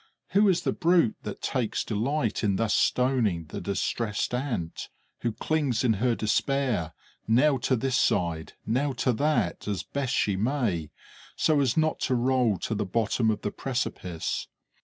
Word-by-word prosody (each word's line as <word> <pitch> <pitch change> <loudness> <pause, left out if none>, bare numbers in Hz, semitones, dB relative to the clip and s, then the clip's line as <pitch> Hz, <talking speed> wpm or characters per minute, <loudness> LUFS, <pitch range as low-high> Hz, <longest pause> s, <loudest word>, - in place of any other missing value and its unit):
Who 205 +1 +4
is 180 -1 +2
the - - +1
brute 170 -8 +3
that - - -7
takes 120 -4 -1
delight 115 +3 -1
in 100 -2 +2
thus 110 0 +1
stoning 120 -10 +2
the 75 - -7
distressed 105 +3 -1
Ant, 120 - -3 0.3
who 120 - -1
clings 140 +1 0
in 120 -3 +4
her 125 -2 +2
despair 115 - 0 0.3
now 130 +5 +4
to 130 +2 +1
this 130 +2 0
side, 80 -2 0
now 135 +5 0
to 125 0 +1
that, 150 0 0
as 100 -4 -2
best 135 +1 -2
she 100 - +1
may, 105 - -1 0.5
so 155 -2 +3
as 135 -2 +1
not 155 0 +2
to 130 - +2
roll 125 -4 +2
to - - -2
the 105 0 -1
bottom 110 +3 +1
of 110 - -1
the 105 - -2
precipice? 95 -10 -3
120 Hz, 160 wpm, -27 LUFS, 105-135 Hz, 0.5 s, Who